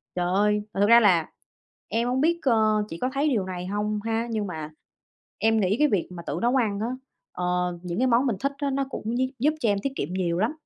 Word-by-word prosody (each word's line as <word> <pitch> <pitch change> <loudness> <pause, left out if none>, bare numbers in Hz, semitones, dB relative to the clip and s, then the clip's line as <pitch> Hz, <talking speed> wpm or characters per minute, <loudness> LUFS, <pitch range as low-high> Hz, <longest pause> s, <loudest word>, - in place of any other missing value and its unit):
trời 180 -1 0
ơi, 210 +1 +2
mà 195 - -1
thật 205 - +5
ra 235 0 +9
là 180 -8 +3 0.6
em 230 +2 0
hông 255 +1 0
biết, 335 +3 +2
ơ, 220 -4 +3
chị 165 - -6
có 255 - +1
thấy 285 +2 +1
điều 220 -9 0
này 180 -1 -5
hông 210 +1 -1
ha, 225 +1 -1
nhưng 215 -2 -1
mà 155 -4 -6 0.7
em 225 0 +3
nghĩ 195 +1 +2
cái 300 - +5
việc 200 - 0
mà 170 -1 -8
tự 155 - -2
nấu 240 +2 +2
ăn 215 -6 +1
á, 225 - -1 0.5
ờ, 180 - -3 0.4
những 175 -1 -4
cái 260 - +3
món 245 +2 +3
mình 235 - 0
thích 275 +4 0
á, 285 -1 -1
nó 275 0 0
cũng 235 -2 -4
gi 260 +1 0
giúp 300 +5 +3
cho 230 - +2
em 200 -1 +1
tiết 275 - -1
kiệm 160 - -3
nhiều 175 -2 -1
lắm. 215 +7 +1
215 Hz, 255 wpm, -25 LUFS, 190-250 Hz, 0.7 s, ra